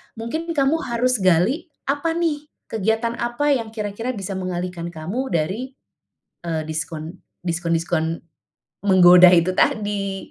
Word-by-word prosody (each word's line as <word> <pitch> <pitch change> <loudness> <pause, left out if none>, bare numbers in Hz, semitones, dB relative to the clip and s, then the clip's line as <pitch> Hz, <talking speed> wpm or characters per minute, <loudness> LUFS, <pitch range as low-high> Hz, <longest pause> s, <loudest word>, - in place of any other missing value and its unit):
mungkin 240 +9 -4
kamu 285 +3 +2
harus 250 -2 0
gali, 185 - +2 0.2
apa 290 +4 -1
nih 305 -3 -1 0.2
kegiatan 225 +2 0
apa 240 +5 0
yang 230 -4 -2
kira-kira 215 +3 -3
bisa 195 -1 -5
mengalihkan 180 -1 -4
kamu 180 +12 -4
dari, 190 +11 -2 0.7
eee, 160 -2 -2
diskon 160 +2 -5 0.3
diskon-diskon 165 -1 -1 0.7
menggoda 180 -1 +8
itu 170 +1 +3
tadi. 200 -1 -1
200 Hz, 115 wpm, -22 LUFS, 175-250 Hz, 0.7 s, menggoda